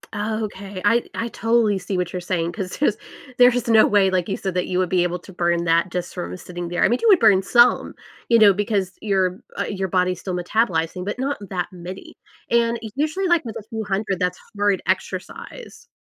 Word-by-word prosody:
Okay. 205 -3 -4
I 230 +3 +4
I 230 - -2
totally 225 -3 +1
see 185 +1 -4
what 180 -1 -2
you're 180 - -2
saying, 175 -1 -2
'Cause 185 -1 -5
'cause 295 - +1 0.4
there's 245 -1 +4
no 220 -1 +6
way, 200 -2 +4
like 180 -1 0
you 195 - -1
said, 190 -2 -3
that 180 - -1
you 180 - -1
would 185 -2 0
be 180 -2 +2
able 175 0 -1
to 190 - -14
burn 170 -1 0
that 170 +2 +2
just 180 -1 -4
from 85 +1 -5
sitting 175 -1 -7
there. 175 +3 0
I 190 - +6
mean, 240 +4 +1
you - - +2
would 380 - +7
burn 205 -4 +5
some, 240 +5 +3 0.3
you 230 - +6
know, 205 -3 +7
because 200 -2 -1
your, 190 -2 0 0.2
uh, - - +1
your 190 -2 -3
body's 180 -1 0
still 185 -2 -4
metabolizing, 180 -2 -1
but 205 - -3
not 280 +2 -1
that 180 -3 -2
many, 185 - -9 0.4
and 235 0 +2 0.2
usually, 315 +7 -1
like, 345 -3 +3
with 225 - -6
a - - -8
few 220 -2 -4
hundred 195 -1 -2
that's 180 0 -1 0.2
hard 205 -1 +1
exercise. - - -5
195 Hz, 215 wpm, -22 LUFS, 180-225 Hz, 0.4 s, would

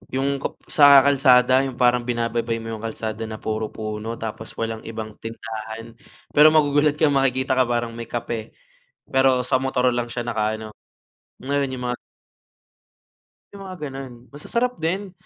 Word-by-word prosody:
yung 140 +1 0
kap - - -4 0.2
sa 145 -2 +8
kalsada 130 -1 +5
yung 130 -2 -5
parang 120 -1 +3
binababay 115 -1 -1
mo 115 - -7
yung 110 0 -6
kalsada 110 0 -4
na 110 -1 -8
puro 110 0 -2
puno 110 +1 -5
tapos 110 0 -6
walang 115 -1 -4
ibang 110 -1 -7
tindahan. 115 0 -7 0.3
Pero 150 +1 +7
magugulat 145 -1 +3
ka 150 0 +3
makikita 130 -1 +1
ka 130 - +4
parang 120 -1 -1
may 115 - -5
kape, 120 -2 -5 0.6
pero 130 -1 +3
sa 130 - +2
motor 130 -1 +1
lang 120 -1 -2
siya 120 -1 -4
nakaano, 110 -1 -2 0.7
meron 140 0 -1
yung 125 -1 -6
mga 125 - -2 1.6
yung 200 -1 -10
mga 185 -1 -7
gano'n. 135 -1 -7 0.2
Masasarap 235 - -2
din. 185 +4 -2
125 Hz, 155 wpm, -23 LUFS, 115-135 Hz, 1.6 s, sa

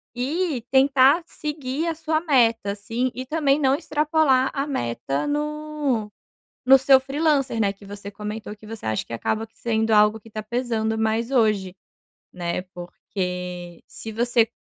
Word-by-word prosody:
E 290 +2 -1
tentar 270 +4 +5
seguir 300 -1 -4
a 330 - -1
sua 315 0 -1
meta 230 - +2
assim, 230 +5 -2
e 255 - -5
também 290 0 +1
não 270 -2 +3
extrapolar 295 -2 +2
a 275 0 -2
meta 135 - -2
no 295 -6 -2 0.5
no 265 +1 +8
seu 265 0 +6
freelancer, 275 -3 0
né, 200 -2 +2
que 200 +1 -18
você 200 0 -8
comentou 210 +1 -6
que 215 - -15
você 225 0 -8
acha 110 -1 -1
que - - -10
acaba 220 - -2
que 225 0 -39
sendo 220 -1 0
algo 210 +1 +5
que 220 - -17
tá 215 0 -5
pesando 225 -1 -1
mais 220 +2 0
hoje, 210 -7 +1 0.6
né? 175 0 -3
Porque 180 -1 -6
se 225 - -8
você 235 +1 +2
235 Hz, 155 wpm, -23 LUFS, 210-280 Hz, 0.6 s, no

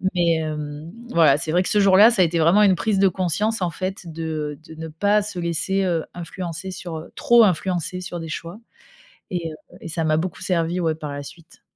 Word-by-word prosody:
Mais, 170 -2 +3
hem, 150 -1 -4 0.2
voilà, 155 - +5
c'est 155 - -3
vrai 180 +3 +3
que - - -2
ce 210 - +3
jour-là, 200 +4 +7
ça 215 - +2
a - - +6
été 165 0 -1
vraiment 170 +6 +5
une 195 -2 +5
prise 195 +4 0
de 195 0 +5
conscience 190 +4 -1
en 175 - 0
fait 185 +1 -5
de, 165 0 -6 0.3
heu, 160 +1 -14
de 160 - -14
ne 160 - -5
pas 205 +7 +2
se 205 -2 -6
laisser 170 +3 -1
heu 170 -4 0
influencer 175 +1 -6
sur, 175 -3 -6
heu, 155 - -10
trop 235 -1 +5
influencer 180 -1 0
sur 175 -1 -6
des 165 - -7
choix, 170 +4 -6 0.7
et 170 -3 -3
heu, 155 - -9 0.2
et - - -9
ça 165 0 -2
m'a 155 -1 +2
beaucoup 175 +1 -3
servi, 175 0 0
ouais, 160 -1 +1
par 150 -2 -6
la 145 0 -5
suite. 165 +3 -14
170 Hz, 230 wpm, -22 LUFS, 160-190 Hz, 0.7 s, jour-là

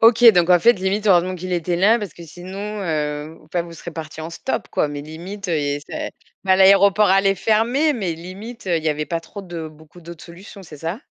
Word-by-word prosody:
OK, 230 +1 +5
donc 175 -1 +3
en 180 - +7
fait, 235 +7 +6
limite 195 +3 -2
heureusement 185 -1 +4
qu'il 185 +1 -6
était 175 0 -1
là 215 +6 +4
parce 205 -5 -7
que 170 - -12
sinon, 195 +5 -7
heu, 150 -1 -3
enfin 170 +2 -2
vous 170 - -11
serez 170 +1 -9
partis 160 -1 -8
en 160 - -6
stop - - -4
quoi, 150 - 0
mais 145 -1 -6
limite, 180 +6 -8
heu, 165 - +1
il 150 - -1
y 145 0 -1
a - - -8
c'est - - -5 0.4
enfin, 190 0 +5
l'aéroport 200 +2 +6
allait 195 +1 +4
fermer, 230 - +2
mais 195 -10 -2
limite, 195 +7 -10
heu, 175 -2 +2
il 160 - -4
y - - +2
avait 150 0 -1
pas 165 +1 -2
trop 200 +4 -10
de 170 -3 -6
beaucoup 155 +3 -17
d'autres 170 0 -11
solutions, 190 +3 -12
c'est 155 -4 -12
ça? 165 - -4
180 Hz, 240 wpm, -21 LUFS, 160-200 Hz, 0.4 s, en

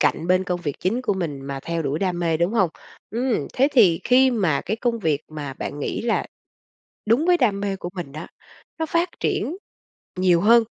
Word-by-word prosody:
cạnh 150 +3 +1
bên 185 +1 +3
công 180 -1 -2
việc 145 -5 -3
chính 225 +8 0
của 205 - 0
mình 155 -7 -3
mà 135 0 -5
theo 170 -1 -2
đuổi 145 +2 -1
đam 180 -3 -1
mê, 165 -2 +1
đúng 170 +5 0
hông? 195 -7 +2 0.4
Ừm, 240 +1 0
thế 270 +3 +3
thì 190 -11 +5
khi 260 +1 +5
mà 185 - +1
cái 215 +5 -3
công 235 0 -1
việc 155 -8 0
mà 145 -3 -6
bạn 145 - -5
nghĩ 145 - -3
là 230 0 0 0.8
đúng 235 +9 +3
với 355 -1 +5
đam 210 -8 +2
mê 200 -1 -1
của 175 - -6
mình 175 -7 -6
á, 155 +3 -7 0.5
nó 320 - 0
phát 335 +2 +1
triển 345 +6 -1 0.6
nhiều 180 -2 +4
hơn, 230 +3 +6
185 Hz, 210 wpm, -23 LUFS, 160-235 Hz, 0.8 s, hơn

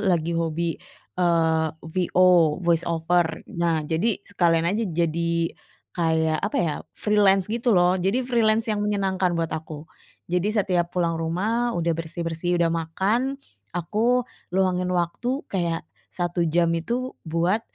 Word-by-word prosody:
lagi 170 -5 +1
hobi, 165 0 -1 0.4
eee, 165 -2 +2 0.2
VO, 175 -1 +3
voice 170 -1 +2
over. 170 0 0
Nah, 170 -4 0
jadi 170 +8 0
sekalian 170 -4 +2
aja 215 +5 0
jadi 170 0 0 0.4
kayak 160 -2 +1
apa 205 - -2
ya, 160 -4 0 0.2
freelance 200 -2 +3
gitu 235 +1 +1
loh. 180 +1 +4
Jadi 200 +8 +1
freelance 225 -2 +2
yang 210 - -1
menyenangkan 190 -3 0
buat 165 -2 -2
aku. 155 -1 -6 0.5
Jadi 180 +3 +1
setiap 180 -4 +1
pulang 170 -2 +1
rumah 220 +9 0
udah 170 -1 +1
bersih-bersih, 165 +1 -2
udah 165 -1 +2
makan 195 +11 0 0.4
aku 230 +8 +1 0.3
luangin 185 -1 +1
waktu 240 - -1
kayak 170 -4 -1 0.3
1 175 -1 -1
jam 170 +1 +2
itu 245 +9 -2 0.2
buat, 170 +6 +1
175 Hz, 130 wpm, -24 LUFS, 165-200 Hz, 0.5 s, loh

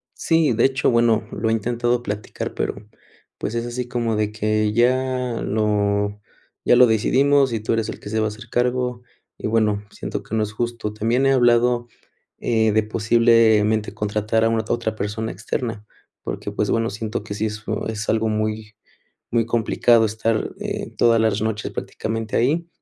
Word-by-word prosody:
Sí, 165 -5 +2
de 115 - +3
hecho, 135 0 +2
bueno, 115 -2 +2
lo 110 - -1
he - - +2
intentado 120 +2 0
platicar, 105 -1 -5
pero, - - -2 0.6
pues, 110 - -3
es 115 0 -1
así 120 +1 -4
como 120 -2 -1
de 105 0 0
que: 110 0 0
"Ya 125 +1 +1
lo 105 -1 0 0.4
ya - - +5
lo 125 0 +8
decidimos, 135 +5 +3
y 115 - -1
tú 110 +2 -1
eres 115 -1 -1
el - - -6
que - - -9
se 110 +1 -1
va 110 - +1
a - - +1
hacer 115 +3 -11
cargo". 125 0 0 0.4
Y - - -4
bueno, 105 -2 +1
siento - - -5
que 110 - -5
no 110 - +2
es 105 0 -5
justo. 115 -2 -3
También 115 +5 +1
he 135 - +4
hablado, 120 -1 +3 0.5
eh, 110 -2 +1
de 110 +1 +2
posiblemente 110 -1 +3
contratar 105 +2 0
a - - +3
una 115 -1 0
otra 115 -2 -1
persona 110 +2 -3
externa, 115 +2 -4 0.4
porque, - - -5
pues, - - -1
bueno, 115 0 +1
siento 110 0 -4
que 105 - -6
sí 105 +2 -1
es 110 +1 -8
oh - - -2
es 110 -1 -4
algo 110 0 +1
muy 110 0 -3 0.6
muy 115 -1 +2
complicado 115 0 +3
estar, 110 +1 -1
eh, 210 -1 -4
todas 115 -1 +4
las 110 -2 +1
noches 110 -1 -2
prácticamente 110 0 -4
ahí. 155 +8 +1
110 Hz, 180 wpm, -22 LUFS, 110-120 Hz, 0.6 s, lo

